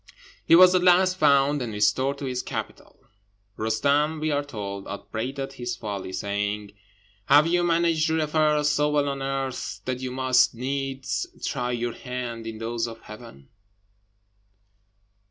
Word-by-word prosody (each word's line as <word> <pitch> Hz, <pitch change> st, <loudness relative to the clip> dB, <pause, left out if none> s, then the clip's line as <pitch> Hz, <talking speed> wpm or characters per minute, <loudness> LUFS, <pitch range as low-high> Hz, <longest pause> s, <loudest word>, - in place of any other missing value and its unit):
He -, -, +7 dB
was 185 Hz, +1 st, +8 dB
at 185 Hz, -, +3 dB
last 185 Hz, +1 st, +4 dB
found 140 Hz, -2 st, +3 dB
and 120 Hz, -3 st, -3 dB
restored 105 Hz, +7 st, +1 dB
to 140 Hz, -, -6 dB
his 125 Hz, -1 st, -2 dB
capital. -, -, -7 dB, 0.5 s
Roostem, 145 Hz, +7 st, +1 dB
we 155 Hz, 0 st, -1 dB
are 145 Hz, 0 st, 0 dB
told, 100 Hz, -7 st, -6 dB
upbraided 135 Hz, +7 st, -5 dB
his 120 Hz, -2 st, -4 dB
folly, 100 Hz, -5 st, -5 dB
saying 100 Hz, +2 st, -3 dB, 0.6 s
"Have 145 Hz, +2 st, +6 dB
you 175 Hz, +1 st, +2 dB
managed 165 Hz, -2 st, +2 dB
your 160 Hz, -, +1 dB
affairs 150 Hz, -1 st, +2 dB
so 150 Hz, 0 st, +2 dB
well 145 Hz, -1 st, +1 dB
on 140 Hz, -1 st, -3 dB
earth 135 Hz, -1 st, -3 dB
That 125 Hz, -1 st, -2 dB
you 130 Hz, 0 st, -4 dB
must 130 Hz, -1 st, +2 dB
needs 135 Hz, -, -3 dB, 0.2 s
try 125 Hz, -3 st, -2 dB
your 120 Hz, 0 st, -2 dB
hand 120 Hz, -3 st, -6 dB
in 110 Hz, -1 st, -6 dB
those 115 Hz, +1 st, -2 dB
of 115 Hz, -1 st, -10 dB
heaven?" 105 Hz, -, -13 dB
135 Hz, 150 wpm, -25 LUFS, 115-150 Hz, 0.6 s, was